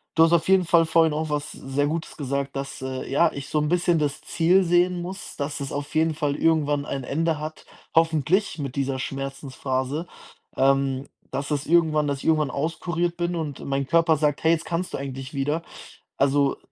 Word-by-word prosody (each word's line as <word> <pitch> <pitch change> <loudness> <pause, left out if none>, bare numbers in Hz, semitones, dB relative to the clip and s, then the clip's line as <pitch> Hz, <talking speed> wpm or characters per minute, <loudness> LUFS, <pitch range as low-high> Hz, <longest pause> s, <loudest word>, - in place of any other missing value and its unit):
du 165 - +7
hast 165 - +4
auf 170 - +3
jeden 190 -1 +5
Fall 165 0 +4
vorhin 160 -1 +4
auch 155 +1 -2
was 150 -1 -2
sehr 135 +2 -2
Gutes 160 +2 -4
gesagt, 140 -1 -3
dass, 135 -1 -5
äh, 130 0 -4
ja, 165 +4 +4
ich 140 -1 -7
so 155 - +1
'n 150 - 0
bisschen 175 -1 +2
das 145 -1 -1
Ziel 180 +3 +3
sehen 175 +1 +2
muss, 190 +2 -7
dass 145 +1 -3
es 140 - -5
auf 145 +1 -5
jeden 160 0 +2
Fall 145 -1 -1
irgendwann 150 -3 +2
ein 135 -2 -4
Ende 160 +4 0
hat, 155 +1 -7 0.3
hoffentlich 165 +4 +2
mit 135 -3 -4
dieser 135 -1 -1
Schmerzensphase, 135 +2 -3 0.5
ähm, 135 0 +2 0.2
dass 140 +3 -3
es 145 -1 -1
irgendwann 155 -3 +3
dass 140 -1 -1
ich - - -10
irgendwann 155 -3 +3
auskuriert 170 +4 -2
bin 175 0 -1
und 150 -4 -4
mein 140 0 -1
Körper 165 +2 +4
sagt: 150 -1 0
„Hey, 160 +1 +5
jetzt 165 - -2
kannst 175 +2 -3
du - - -2
eigentlich 135 0 -6
wieder.” 145 +4 0 0.6
Also, 140 0 +2
150 Hz, 195 wpm, -24 LUFS, 140-165 Hz, 0.6 s, du